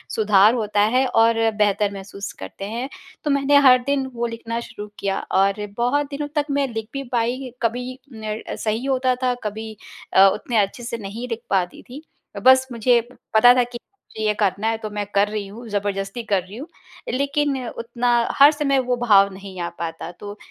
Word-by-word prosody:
सुधार 210 0 +5
होता 210 -3 0
है 260 +1 +4
और 230 -1 +3 0.2
बेहतर 205 -1 +2
महसूस 200 0 -7
करते 95 - -7
हैं। 235 +5 -4 0.3
तो 295 - 0
मैंने 280 +1 +4
हर 255 0 +8
दिन 280 -1 +1
वो 235 0 -2
लिखना 230 0 -5
शुरू 210 -3 -8
किया 195 -1 -1 0.2
और 200 +2 +1
बहुत 280 +5 +1
दिनों 290 +1 -4
तक 295 -1 +1
मैं 280 0 +1
लिख 220 -1 -4
भी 275 0 -3
पाई 245 +2 -1
कभी 250 +3 -2
ने 220 -1 -5
सही 220 +3 -2
होता 260 -2 +1
था 250 -1 +2
कभी 220 +1 -5 0.4
अ, 195 +1 +8
उतने 240 - -3
अच्छे 205 +4 0
से 235 0 -4
नहीं 220 +3 -6
लिख 230 -1 -4
पाती 185 -3 0
थी। 270 +4 -9 0.4
बस 260 0 +6
मुझे 235 +1 +3 0.3
पता 245 +3 +7
था 250 0 +3
कि 240 0 -7
मुझे 375 - -11
ये 210 - +3
करना 205 0 0
है 225 0 0
तो 220 -1 -6
मैं 210 0 -3
कर 200 +1 +4
रही 210 -1 -4
हूँ 230 +4 -10
जबरदस्ती 200 +2 -2
कर 195 -2 +2
रही 195 +4 -11
हूँ 285 +6 -7 0.5
लेकिन 280 +1 0
उतना 235 +1 -3 0.3
हर 285 +2 +9
समय 290 -3 +1
वो 250 - +2
भाव 200 -5 +5
नहीं 190 -1 -10
आ 170 - -2
पाता। 165 0 -5
तो 205 0 -8
230 Hz, 195 wpm, -22 LUFS, 205-255 Hz, 0.5 s, हर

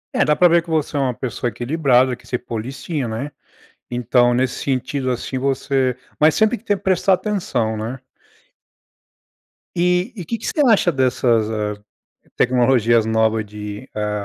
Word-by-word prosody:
É, - - +4
dá 150 - +2
pra 180 +4 +5
ver 170 0 +4
que 170 - -14
você 155 -2 -1
é 145 - +1
uma 130 -2 0
pessoa 120 0 -3
equilibrada, 130 +1 +2
que 120 - -20
se 125 - -1
policia, 130 +5 -4
né. 115 +7 -4 0.6
Então, 120 0 +2
nesse 130 0 -1
sentido, 130 0 -1
assim, 130 +1 -3
você 135 -1 0 0.2
mas 155 +1 +5
sempre 220 +2 +3
que - - -20
tem 205 -3 0
que 195 - -19
prestar 190 +1 +3
atenção, 175 - -1
né. 115 +5 -5 1.8
E 180 +6 +1
e 185 - -6
que 230 - -3
que 225 - -9
você 305 - 0
acha 200 -6 +4
dessas, 125 -5 +1
ah, 105 -1 -2 0.6
tecnologias 120 -3 +3
novas 110 0 +1
de 105 +3 -8
hã 105 0 -1
130 Hz, 165 wpm, -20 LUFS, 115-160 Hz, 1.8 s, pra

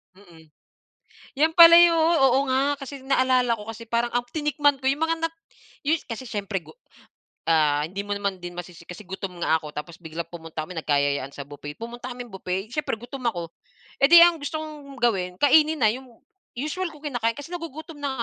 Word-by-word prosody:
Mm. 165 -5 -18 0.9
'Yan 315 +2 +3
pala 335 0 +10
yu 345 -1 +7
oo, 315 -6 +4
nga 275 +2 +2
kasi 275 +1 -7
naalala 255 -3 +3
ko 215 0 -8
kasi 230 +1 -10
parang 235 +1 0
ang 245 0 -1
tinikman 295 0 +1
ko 265 - +3
yung 280 - -1
mga 330 0 -2
nat 330 0 -1 0.5
yu 305 - +4 0.2
kasi 240 +3 -5
siyempre 205 -3 -3
gu 175 - -16 0.7
ah, 150 -2 +3
hindi 195 +5 -5
mo 205 - -4
naman 200 -3 -3
din 175 0 -7
masisi 175 -1 -9
kasi 180 +2 -10
gutom 190 -2 -6
nga 160 - +3
ako 155 -2 -9
tapos 150 +3 -7
biglang 165 +1 -6
pumunta 165 -2 -6
kami 180 - -9
nagkayayaan 140 -2 0
sa 140 -1 -8
buffet. 145 0 -8
Pumunta 240 +2 -7
kaming 245 0 -8
buffet 190 +2 -4
siyempre 300 -1 -2
gutom 250 +2 -9
ako, 170 -5 -6 0.5
eh, 275 - +9
'di 345 - +10
ang 345 0 +6
gusto 290 +2 -3
kong 290 -4 -10
gawin, 190 -7 +1
kainin 310 +2 +5
na 220 - +5
'yong 260 +3 -6 0.5
usual 315 +6 -3
ko 300 - -14
kinakain 245 -6 -1
kasi 290 - -8
nagugutom 320 -2 -8
na 265 -4 -3
240 Hz, 195 wpm, -24 LUFS, 180-290 Hz, 0.9 s, pala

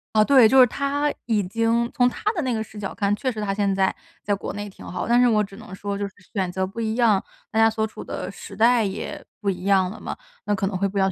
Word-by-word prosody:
啊， 215 - +6
对， 255 -3 +6
就 265 - +6
是 255 - +10
他 280 +4 -1
已 215 -4 +2
经 230 +4 +1
从 245 0 +4
他 420 - -1
的 350 - -1
那 260 -4 -1
个 220 -2 -1
视 210 -1 -11
角 195 - -5
看， 200 -1 +1
确 255 +5 -1
实 220 - -7
他 205 -2 -1
现 200 -1 +1
在 190 0 +2 0.3
在 205 - 0
国 200 - -3
内 205 0 -5
挺 195 - -13
好。 180 - -4
但 240 +1 +4
是 250 - +5
我 215 -3 +3
只 195 0 -9
能 215 -4 -11
说 200 +1 -4
就 200 0 -2
是 195 - -14 0.2
选 190 -3 -1
择 190 +1 -1
不 205 +5 -6
一 220 0 -1
样， 225 -5 +3 0.3
大 220 - +1
家 225 0 +6
所 220 0 -1
处 220 - -8
的 185 +1 -5
时 200 - -10
代 235 +2 +4
也 195 -2 -4 0.2
不 205 -2 0
一 180 0 -7
样 190 -2 +3
了 220 - -9
嘛， - - -6 0.3
那 205 - +1
可 195 - -1
能 195 0 -2
会 195 +2 +1
不 200 - -5
一 - - +3
样， 190 0 +3
210 Hz, 315 characters per minute, -23 LUFS, 195-230 Hz, 0.3 s, 是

